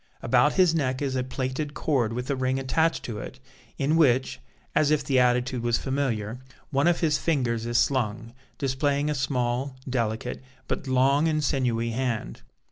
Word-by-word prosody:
About - - +3
his 180 -4 +4
neck 130 -5 0
is 135 -2 -2
a 130 - 0
plaited 130 +3 -3
cord 130 -8 0
with 125 +2 -4
a - - +1
ring 130 0 0
attached 160 +5 +1
to 110 -3 -5
it, 130 - -8 0.4
in 145 +3 +1
which, 130 -5 +3 0.3
as 150 - +3
if 150 -1 +2
the 135 -1 +2
attitude 125 0 +2
was 120 -1 +1
familiar, 125 -5 -2 0.3
one 140 +3 +2
of 175 -1 +2
his 155 -3 +2
fingers 120 -8 0
is 120 0 +1
slung, 115 -3 0 0.2
displaying 140 +2 0
a - - +1
small, 130 -1 -1
delicate, 120 -1 -2 0.3
but - - -3
long 135 +4 +3
and 155 -1 0
sinewy 120 -5 0
hand. 115 - -3
130 Hz, 170 wpm, -26 LUFS, 120-145 Hz, 0.4 s, his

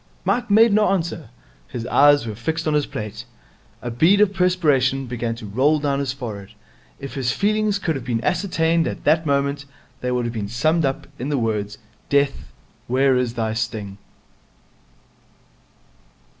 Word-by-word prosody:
Mike 245 - 0
made 220 +1 +5
no 210 0 +4
answer. 170 - -2 0.4
His 115 - -6
eyes 145 +1 +5
were 110 - -4
fixed 160 +9 -3
on 155 - +1
his 150 -1 +1
plate. 105 +1 -6 0.6
A 120 - -3
bead 165 - +4
of 205 -1 +4
perspiration 150 -8 +2
began 120 -1 -3
to 115 - -9
roll 130 +9 +2
down 140 -2 -1
his 140 -2 -1
forehead. 110 -7 -8 0.4
If 140 - -7
his 130 -3 -1
feelings 215 0 +1
could 170 -5 -1
have 135 - -5
been 120 -2 -2
ascertained 170 - +1
at - - -5
that 160 +1 +2
moment, 140 0 0 0.3
they 125 - -2
would 125 -1 0
have 120 - -3
been 105 -3 -3
summed 155 +8 +1
up 135 0 -2
in 130 +4 -3
the 145 - 0
words, 105 -3 -2 0.3
'Death, 140 -1 0 0.4
where 130 +2 +3
is 125 -2 -1
thy 110 -2 -1
sting?' 110 -4 -4
140 Hz, 165 wpm, -22 LUFS, 120-160 Hz, 0.6 s, made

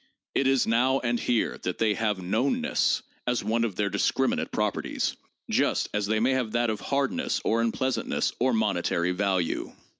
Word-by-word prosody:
It 135 - +2
is 135 -2 +3
now 125 +4 +3
and 120 -1 0
here 120 -2 0
that 90 - -3
they 110 -2 +2
have 105 -2 -1
'known 110 +9 +1
ness' - - +1 0.2
as 125 -1 0
one 115 +1 +1
of 110 -5 -2
their 100 0 0
discriminated 125 +6 0
properties— - - -1 0.3
just - - +1
as 105 -1 0
they 110 +1 +1
may 120 +4 +2
have 125 -4 -1
that 120 -1 +2
of 105 - -4
hardness 140 -1 0
or 115 +1 +2
unpleasantness 130 +3 0
or 130 +2 +3
monetary 90 -5 +1
value. 95 -2 -1
115 Hz, 175 wpm, -27 LUFS, 105-125 Hz, 0.3 s, is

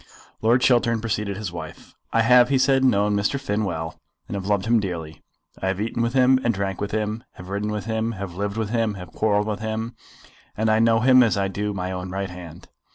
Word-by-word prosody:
Lord 120 +3 +3
Chiltern 120 -2 +3
preceded 105 -3 -2
his 105 -4 -4
wife. 85 -3 -9 0.2
"I 115 - +3
have," 125 +1 +6
he 140 - +3
said, 135 0 +3
"known 105 -5 +3
Mr. 100 +7 0
Finn 110 -5 -1
well, 80 -3 -4 0.3
and - - -6
have 100 -1 -4
loved 100 -2 +1
him 115 0 +3
dearly. 85 -6 -5 0.4
I 95 - -1
have 95 0 -1
eaten 115 +2 -2
with 115 +1 0
him 130 0 +5
and 115 -2 +1
drank 95 -1 -3
with 100 - -2
him, 110 +2 -2
have 90 0 -11
ridden 100 +2 -2
with 105 -1 -3
him, 110 0 -1
have 95 -3 -6
lived 100 +3 -3
with 110 -2 -2
him, 115 -3 0
and - - -9
have 90 -2 -9
quarrelled 105 -1 +1
with 105 -1 -3
him; 110 +2 -3 0.6
and 110 +1 +2
I 110 - +3
know 115 0 +4
him 130 +1 +6
as 115 -4 +3
I 100 -1 0
do 105 +2 -2
my 95 -2 -3
own 90 0 -5
right 95 0 -4
hand." 90 -3 -11
105 Hz, 235 wpm, -23 LUFS, 95-115 Hz, 0.6 s, have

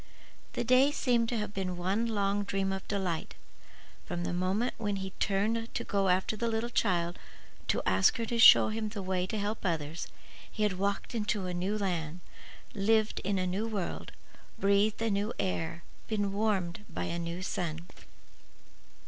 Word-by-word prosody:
The - - -1
day 255 +4 +5
seemed 240 -5 +1
to 240 - -1
have 210 -1 -3
been 185 -2 -3
one 195 +6 0
long 205 -2 0
dream 195 -1 -1
of 190 - -6
delight. 185 -5 -2 0.7
From 175 -1 -4
the - - -2
moment 190 +7 0
when 205 -1 -1
he 190 -1 -4
had - - -26
turned 220 +4 0
to - - -1
go 200 -2 0
after 185 +3 +2
the 235 +2 -1
little 230 +1 -1
child 175 -7 +1 0.5
to - - +1
ask 95 +1 +4
her 230 - -1
to 235 +1 -2
show 230 - +9
him 215 0 -2
the 205 -2 -5
way 185 -1 -1
to 215 - -3
help 210 +2 -2
others, 160 -3 -2 0.4
he 215 - -2
had 190 -3 0
walked 200 +3 -1
in 215 -3 -2
a 185 -3 -3
new 185 +4 -1
land; 175 -4 -2 0.5
lived 215 +1 +2
in 200 +1 -1
a 185 - 0
new 195 +5 -1
world; 205 -5 -4 0.5
breathed 200 +3 +2
a 225 - +1
new 205 +3 0
air; 170 -2 -2 0.2
been 205 -3 0
warmed 200 -3 0
by - - -4
a 170 - -2
new 170 +2 -4
sun. 170 -2 -3
200 Hz, 180 wpm, -31 LUFS, 180-215 Hz, 0.7 s, show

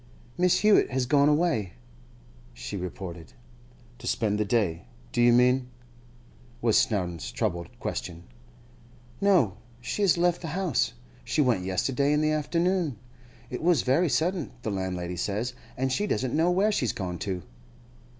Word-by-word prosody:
'Miss 180 +1 +3
Hewett 210 -1 +5
has 130 -1 0
gone 140 +3 +4
away,' 150 - +1 0.8
she - - -6
reported. 90 -3 -7 0.7
'To - - -8
spend 105 -2 0
the 105 - +1
day, 100 - 0 0.3
do - - +1
you 120 0 +6
mean?' 125 +1 +4 0.9
was 115 -2 +2
Snowdon's 90 -7 0
troubled 85 0 -2
question. 85 -1 -5 1.0
'No, 175 - +3 0.2
she 120 +11 -4
has 195 -4 +4
left 175 0 +2
the 170 - -5
house. 185 -9 0 0.3
She - - -2
went 120 -10 +2
yesterday, 135 +10 +1
in 150 - +2
the 155 0 +2
afternoon. 165 - 0 0.5
It 125 - -4
was 170 -5 +3
very 150 +7 +2
sudden, 170 0 0
the 110 - -2
landlady 90 -2 -3
says, 105 +7 -2 0.2
and 130 +1 0
she 205 +11 0
doesn't 125 - -1
know 165 +3 +3
where 195 +4 +3
she's 125 - 0
gone 90 -7 -4
to. 95 -4 -3
125 Hz, 150 wpm, -27 LUFS, -, 1.0 s, you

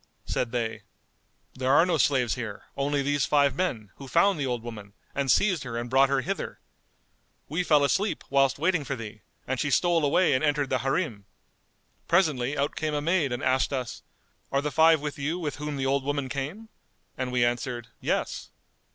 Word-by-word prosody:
Said 120 - -2
they, 115 -2 -2 0.7
"There 130 0 0
are 155 +5 +6
no 175 -4 +1
slaves 125 -2 +2
here; 115 -5 -6
only 140 0 0
these 145 -1 +1
five 140 -2 +3
men, 125 - -2
who 135 - -9
found 170 +6 +3
the 140 - -1
old 120 -2 -2
woman, 105 -4 -9 0.2
and 140 -1 -1
seized 185 +1 +3
her 120 -2 -5
and 120 +1 -4
brought 135 +1 +5
her 135 -1 +2
hither. - - -4 0.9
We 160 +5 -1
fell 150 -4 +4
asleep, 195 +8 0
whilst 135 -1 +3
waiting 165 +1 +1
for 140 0 -3
thee, 110 -2 -9 0.2
and 130 -1 -2
she 145 - 0
stole 170 +3 +2
away 145 +3 +3
and 130 - +1
entered 145 -2 +1
the 130 - +2
Harim. 130 - -2 0.8
Presently 150 -6 +2
out 140 +1 -1
came 155 -1 -2
a - - +1
maid 165 -4 +1
and 120 +3 -3
asked 130 +2 +2
us:—Are 135 +1 -5
the 150 - -1
five 160 0 +5
with 150 -1 -5
you 150 +5 -1
with 150 -7 -4
whom 150 -1 -4
the 135 - -1
old 135 0 +1
woman 140 -1 -2
came?"; 150 +12 -5 0.5
and 130 -1 -3
we 125 -1 +3
answered, 120 0 -2
"Yes." - - -2
140 Hz, 190 wpm, -27 LUFS, 125-150 Hz, 0.9 s, are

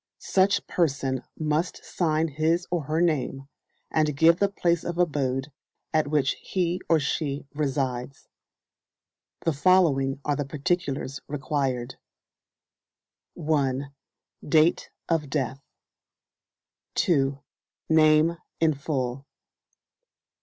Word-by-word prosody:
Such 195 +1 +2
person 135 -6 0 0.2
must 155 +3 -1
sign 160 -2 0
his 160 +4 +1
or 170 -5 -1
her 155 +3 0
name, 140 -5 0 0.4
and 155 -2 +1
give 165 +3 +5
the 200 - +3
place 170 -4 0
of 170 0 -4
abode 140 -5 0 0.4
at 155 -2 +2
which 145 -3 +2
he 180 -1 -1
or 165 - +5
she 145 0 -2
resides. 135 -3 -2 1.1
The 165 - +1
following 145 -5 +3
are 145 - +1
the 145 - -1
particulars 145 -1 -2
required: 135 -4 -2 1.4
1. 140 -4 -1 0.5
Date 155 +3 +3 0.2
of 160 -4 0
Death. 135 -2 -2 1.3
2. 140 -5 +2 0.5
Name 155 +1 +4 0.2
in 160 -1 +3
full. 135 -2 -3
150 Hz, 100 wpm, -26 LUFS, 135-165 Hz, 1.4 s, give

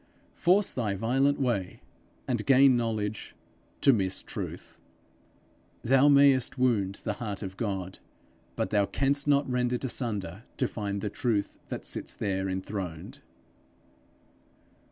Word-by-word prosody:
Force 190 +3 +2
thy 105 -6 -1
violent 135 +7 +1
way, 115 -9 -1 0.5
and 120 -4 -1
gain 135 -1 +6
knowledge, 110 -3 -2 0.5
to 140 - +6
miss 95 -4 -1
truth. - - -7 1.0
Thou 135 +3 +5
mayest 140 -2 +5
wound 110 -7 +1
the - - -1
heart 105 -3 -4
of 95 -1 -6
God, 95 -4 -4 0.6
but - - -2
thou 100 -2 +2
canst 140 +1 0
not 140 0 +3
rend 125 -1 0
it 125 - -2
asunder 105 -7 -2 0.2
to 130 - +1
find 100 -3 -4
the 105 - -3
Truth 105 -4 -1
that - - -5
sits - - -3
there 95 -2 -2
enthroned. 95 -3 -5
115 Hz, 130 wpm, -28 LUFS, 100-130 Hz, 1.0 s, gain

